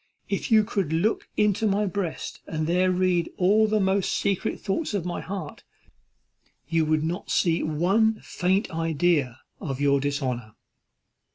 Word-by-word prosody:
If - - -2
you 215 -1 +6
could 195 -7 -2
look 175 +8 0
into 210 +1 +2
my 205 +1 +1
breast, 190 -3 -4
and 155 -1 -2
there 180 +3 +2
read 180 -2 +1
all 210 +4 +4
the 215 0 +1
most 190 0 +1
secret 200 -2 -1
thoughts 210 +4 -2
of 185 -4 -2
my 175 - -3
heart, 185 -6 -7 1.0
you 165 -1 +1
would 155 0 +1
not 170 +4 -3
see 170 -1 +2
one 195 +8 +2
faint 190 +3 0
idea 160 -5 0 0.2
to 135 -3 -3
your 140 0 +3
dishonour." 130 -6 -3
180 Hz, 150 wpm, -25 LUFS, 155-200 Hz, 1.0 s, you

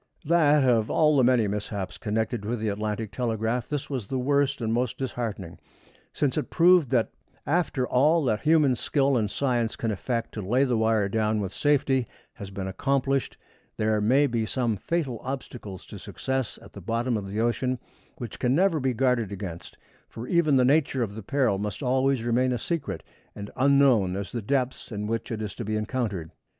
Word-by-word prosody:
That 150 -4 +4
of 115 -3 +3
all 155 -1 +3
the 135 - +4
many 120 -3 +4
mishaps 100 -2 -4
connected 110 0 -2
with 115 +3 -2
the 110 0 -1
Atlantic 105 +1 -3
telegraph, 115 +2 -2
this 145 -2 -3
was 130 -8 -4
the 130 - -2
worst 140 +1 +1
and 115 -2 -1
most 120 0 -1
disheartening, 115 -9 -4 0.5
since 145 0 0
it - - -5
proved 170 -4 +5
that 120 -4 +1 0.3
after 150 -6 0
all 150 +6 +3
that 110 -4 0
human 155 -4 +4
skill 135 +3 +1
and 110 -4 +1
science 120 -2 0
can 115 - -2
effect 115 +3 -3
to 110 - -4
lay 120 +8 +2
the 125 -3 +1
wire 110 -2 +2
down 110 +1 0
with 95 -2 -3
safety 135 -4 +1 0.3
has 100 - -8
been 95 -1 -5
accomplished, 135 +7 -1 0.4
there 110 0 +1
may 130 +7 +4
be 120 -4 0
some 115 0 -1
fatal 135 - -2
obstacles 125 -7 -7
to - - -10
success 130 -2 -3
at - - -15
the - - -9
bottom 115 +2 -1
of 100 -2 -3
the 100 +3 -4
ocean 125 +2 0 0.4
which 120 -4 -7
can 125 +1 +2
never 180 -1 +3
be 130 -2 0
guarded 125 -4 +1
against, 90 -4 -7 0.3
for 115 +2 -8
even 165 -5 +3
the 130 -1 +4
nature 135 -2 +2
of 105 -3 -4
the 110 - -7
peril 125 -3 +1
must 105 +7 -4
always 130 -1 +1
remain 125 +2 +2
as 120 -3 -2
secret 165 -5 -3 0.3
and 100 0 -7
unknown 130 -8 +4
as 100 0 -5
the 120 - -3
depths 130 +3 -2
in 105 -1 -3
which 115 +3 -3
it 110 -1 -3
is 105 -2 -5
to 120 - -6
be 110 0 -2
encountered. 105 - -2
120 Hz, 190 wpm, -26 LUFS, 110-135 Hz, 0.5 s, proved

